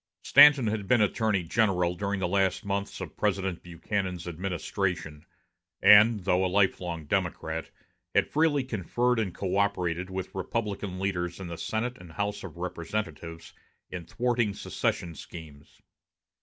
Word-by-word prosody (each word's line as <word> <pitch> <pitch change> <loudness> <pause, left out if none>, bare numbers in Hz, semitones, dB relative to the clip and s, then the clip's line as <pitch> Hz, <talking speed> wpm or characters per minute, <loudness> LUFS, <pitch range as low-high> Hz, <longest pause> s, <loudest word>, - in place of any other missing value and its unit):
Stanton 145 -4 +7
had 105 -2 -2
been 125 - +4
Attorney 105 -2 +1
General 90 -1 +1
during 100 +1 -2
the 90 - +1
last 95 +3 +1
months 100 0 -3
of - - -7
President 95 -3 -1
Buchanan's 90 +1 -4
administration, 90 -2 -3 0.5
and, 105 +2 +7
though 90 0 +2
a - - +2
lifelong 90 -4 0
Democrat, 80 -2 -2 0.5
had - - +4
freely 150 -3 +2
conferred 120 +1 0
and 100 -5 -1
coöperated 95 -2 -1
with 95 0 -5
Republican 100 -1 -3
leaders 90 -2 -2
in 95 - -6
the 85 - -5
Senate 120 +6 -3
and 85 -2 -12
House 105 0 -3
of 85 -3 -9
Representatives 85 -2 -5 0.4
in 90 -2 -6
thwarting 120 -1 0
secession 85 -2 -2
schemes. 75 -2 -12
95 Hz, 135 wpm, -28 LUFS, 85-105 Hz, 0.5 s, Stanton